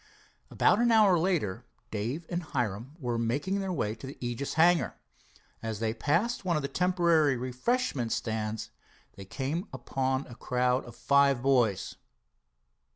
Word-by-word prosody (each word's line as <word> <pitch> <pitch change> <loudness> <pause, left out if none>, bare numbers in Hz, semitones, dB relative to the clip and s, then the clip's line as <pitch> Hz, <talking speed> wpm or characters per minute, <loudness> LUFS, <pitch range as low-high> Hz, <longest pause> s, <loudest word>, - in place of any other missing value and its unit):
About - - +3
an 240 0 +3
hour 205 -6 +5
later 160 - 0 0.3
Dave 120 +10 -3
and 175 0 -2
Hiram 125 - -3
were 120 -6 -2
making 140 +12 -1
their 195 -1 -2
way 110 -11 -1
to 115 +4 -9
the 135 - -9
Aegis 120 +3 -3
hangar. 165 - +4 0.7
As 110 -2 -4
they 110 -1 0
passed 170 - 0
one 175 -2 +1
of 150 - -1
the - - -1
temporary 170 -3 +2
refreshment 130 - -1
stands 110 -1 -3 0.4
they 100 - -9
came 145 - -3
upon 130 +1 -2
a 120 - -11
crowd 125 +1 0
of 120 - -11
five 140 -3 +3
boys. 120 -8 +2
135 Hz, 150 wpm, -29 LUFS, 120-170 Hz, 0.7 s, hour